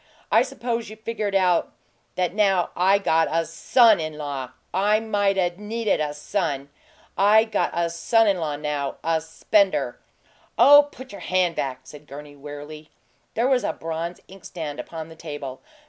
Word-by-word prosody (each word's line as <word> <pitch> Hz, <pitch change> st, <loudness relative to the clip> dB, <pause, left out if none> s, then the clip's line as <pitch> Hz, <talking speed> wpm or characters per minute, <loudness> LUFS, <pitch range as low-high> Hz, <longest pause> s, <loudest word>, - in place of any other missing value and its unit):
I 225 Hz, -, +6 dB
suppose 240 Hz, -3 st, -3 dB
you 215 Hz, -, -9 dB
figure 220 Hz, -1 st, -4 dB
it 200 Hz, -, -2 dB
out 180 Hz, -3 st, +2 dB, 0.4 s
that 180 Hz, -1 st, 0 dB
now 195 Hz, -4 st, +2 dB
I 190 Hz, +3 st, +4 dB
got 165 Hz, -5 st, +2 dB
a 165 Hz, +1 st, 0 dB
SON 220 Hz, +6 st, +4 dB
IN 155 Hz, -1 st, -4 dB
LAW, 140 Hz, -4 st, -5 dB, 0.2 s
I 205 Hz, +4 st, +3 dB
mightn't 200 Hz, -4 st, 0 dB
need 220 Hz, +2 st, -5 dB
a 150 Hz, -6 st, +1 dB
son! 150 Hz, -2 st, -2 dB
Yes, 140 Hz, -, -20 dB, 0.5 s
I 210 Hz, +3 st, +6 dB
got 220 Hz, -2 st, -1 dB
a 170 Hz, 0 st, +1 dB
son 225 Hz, +7 st, +2 dB
in 195 Hz, -3 st, +2 dB
law 155 Hz, -3 st, -2 dB
now 145 Hz, -1 st, -3 dB
a 160 Hz, 0 st, +1 dB
spender!" 190 Hz, +5 st, +1 dB, 0.6 s
"Oh, 290 Hz, +1 st, +8 dB
put 260 Hz, 0 st, -11 dB
your 200 Hz, -, -10 dB
hand 185 Hz, -2 st, +1 dB
back!" 130 Hz, -2 st, -3 dB
said 150 Hz, 0 st, -13 dB
Gurney, 145 Hz, +1 st, -10 dB
wearily. 145 Hz, +2 st, -10 dB, 0.5 s
There 235 Hz, +3 st, +2 dB
was 260 Hz, -3 st, +2 dB
a -, -, -1 dB
bronze 165 Hz, +2 st, -5 dB
inkstand 170 Hz, -5 st, -7 dB
upon 160 Hz, -1 st, -7 dB
the 160 Hz, -, -12 dB
table. 145 Hz, -5 st, -7 dB
175 Hz, 170 wpm, -24 LUFS, 150-210 Hz, 0.6 s, Oh